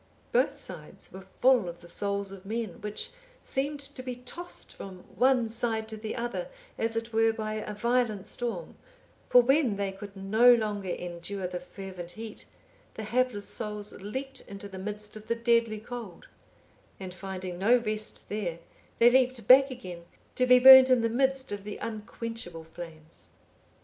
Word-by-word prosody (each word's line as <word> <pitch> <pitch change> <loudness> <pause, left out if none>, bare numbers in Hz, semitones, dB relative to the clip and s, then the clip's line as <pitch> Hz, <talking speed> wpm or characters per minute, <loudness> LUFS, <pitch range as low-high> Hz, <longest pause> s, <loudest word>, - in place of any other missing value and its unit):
Both - - +2
sides - - -7
were 190 - -8 0.2
full 250 -7 +4
of 170 0 -10
the 175 - -13
souls 200 +2 -1
of 195 -1 -10
men 220 -1 -4
which 210 0 -4 0.3
seemed 285 +2 -1
to 275 -1 -8
be 255 -1 -5
tossed 250 +9 -7
from 185 -2 -9
one 255 -2 +3
side 225 -1 -2
to 220 - -4
the 215 0 -5
other 240 - -3 0.3
as 225 0 -1
it 230 0 -4
were 225 0 +4
by 215 -1 -4
a 215 -1 -4
violent 235 -2 +1
storm; 230 -9 -4 0.5
for 245 - +7
when 265 -3 +3
they 200 -1 -1
could 200 +1 -10
no 220 +6 +5
longer 210 -4 -2
endure 180 +2 -4
the 180 0 -3
fervent 180 -1 -9
heat, 220 -1 -9 0.5
the 220 - -5
hapless 230 -2 0
souls 210 -2 -3
leaped 265 +7 -6
into 200 0 -7
the 190 -1 -9
midst 210 +2 -5
of 215 0 -10
the 230 - +1
deadly 230 -2 +2
cold; 225 -4 -8 0.7
and 185 -2 -6
finding 185 -1 -6
no 230 +6 +5
rest 215 -2 -4
there, 200 -5 -3 0.4
they 240 +1 +7
leaped 255 -3 +2
back 270 +2 +8
again 180 -9 -8 0.3
to 255 - +1
be 250 0 +8
burnt 260 +1 +10
in 255 -2 +5
the 230 - +1
midst 265 +2 +1
of 205 -1 -4
the 210 0 -6
unquenchable 220 -5 -6
flames. 160 -1 -12
215 Hz, 170 wpm, -29 LUFS, 195-245 Hz, 0.7 s, burnt